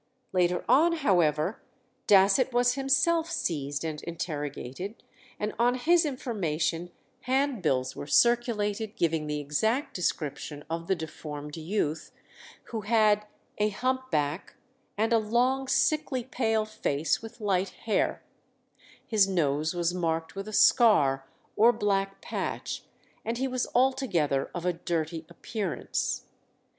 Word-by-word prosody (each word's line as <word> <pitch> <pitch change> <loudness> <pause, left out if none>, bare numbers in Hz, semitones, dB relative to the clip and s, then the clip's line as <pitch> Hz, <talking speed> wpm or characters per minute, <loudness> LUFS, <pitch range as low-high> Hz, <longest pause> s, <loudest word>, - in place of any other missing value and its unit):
Later 180 -1 +1
on, 330 +5 +5
however, 175 - +1 0.5
Dasset 205 +6 +5
was 245 0 +3
himself 275 +5 +2
seized 145 - -2
and 155 -2 -4
interrogated, 160 - -5 0.4
and 210 +1 -2
on 245 +1 +3
his 335 +6 +3
information 175 - -2 0.4
handbills 235 - 0
were - - -7
circulated, 220 - +2
giving 160 -2 0
the 150 0 -2
exact 220 - 0
description 150 -4 -3
of 165 0 -3
the 190 - +2
deformed 150 -2 -7
youth, 160 -2 -2 0.6
who 225 -2 -3
had 210 -1 +3 0.3
"a 210 0 +3
hump 260 +4 -2
back, 150 - -1 0.4
and 225 +2 +1
a 230 - +5
long, 250 +5 +1
sickly, 280 -3 +1
pale 225 -3 0
face, 160 -8 -1
with 225 +2 -10
light 195 -3 0 0.2
hair;" 220 - 0 0.8
his 210 -3 +3
nose 155 -3 0
was 175 0 0
marked 165 -2 -1
with 195 +1 -5
a - - -6
scar 205 - +4 0.3
or 225 +3 +6
black 195 -3 -1
patch, - - -4 0.4
and 230 +1 -2
he 265 +2 0
was 255 -1 -1
altogether 240 - +2
of 175 0 -4
a 180 - +2
dirty 165 -1 -3
appearance. 195 +1 -3
200 Hz, 125 wpm, -28 LUFS, 160-240 Hz, 0.8 s, or